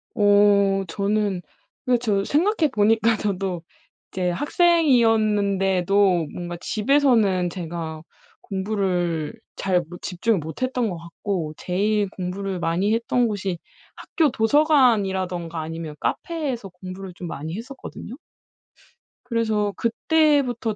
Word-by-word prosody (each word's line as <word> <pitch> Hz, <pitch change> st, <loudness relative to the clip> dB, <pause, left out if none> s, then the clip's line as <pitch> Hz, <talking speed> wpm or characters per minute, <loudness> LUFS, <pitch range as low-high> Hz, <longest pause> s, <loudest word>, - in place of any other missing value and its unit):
어 205 Hz, -1 st, +4 dB
저는 200 Hz, 0 st, -1 dB, 0.4 s
근데 250 Hz, -2 st, +3 dB
저 210 Hz, -4 st, 0 dB
생각해 325 Hz, -, +2 dB
보니까 225 Hz, 0 st, +3 dB
저도 195 Hz, -4 st, -2 dB, 0.5 s
이제 180 Hz, -1 st, -1 dB
학생이었는데도 205 Hz, -, +2 dB
뭔가 175 Hz, -1 st, -6 dB
집에서는 215 Hz, -7 st, +2 dB
제가 165 Hz, -2 st, -6 dB, 0.4 s
공부를 190 Hz, -5 st, -1 dB, 0.2 s
잘 185 Hz, -2 st, +1 dB
못 175 Hz, -, -10 dB
집중을 200 Hz, +4 st, 0 dB
못 160 Hz, -, -8 dB
했던 255 Hz, -3 st, 0 dB
것 175 Hz, -, -5 dB
같고 170 Hz, -1 st, -4 dB
제일 205 Hz, +2 st, 0 dB
공부를 190 Hz, +1 st, -4 dB
많이 175 Hz, +5 st, +1 dB
했던 235 Hz, +1 st, +1 dB
곳이 195 Hz, -4 st, -3 dB, 0.4 s
학교 315 Hz, -3 st, 0 dB
도서관이라든가 210 Hz, -, +2 dB
아니면 160 Hz, -1 st, -6 dB
카페에서 275 Hz, -, -3 dB
공부를 185 Hz, +1 st, -9 dB
좀 175 Hz, -, -7 dB
많이 160 Hz, +1 st, -5 dB
했었거든요. 250 Hz, -1 st, -9 dB, 1.1 s
그래서 220 Hz, -4 st, 0 dB
그때부터 250 Hz, -3 st, +1 dB
200 Hz, 260 characters per minute, -23 LUFS, 180-230 Hz, 1.1 s, 어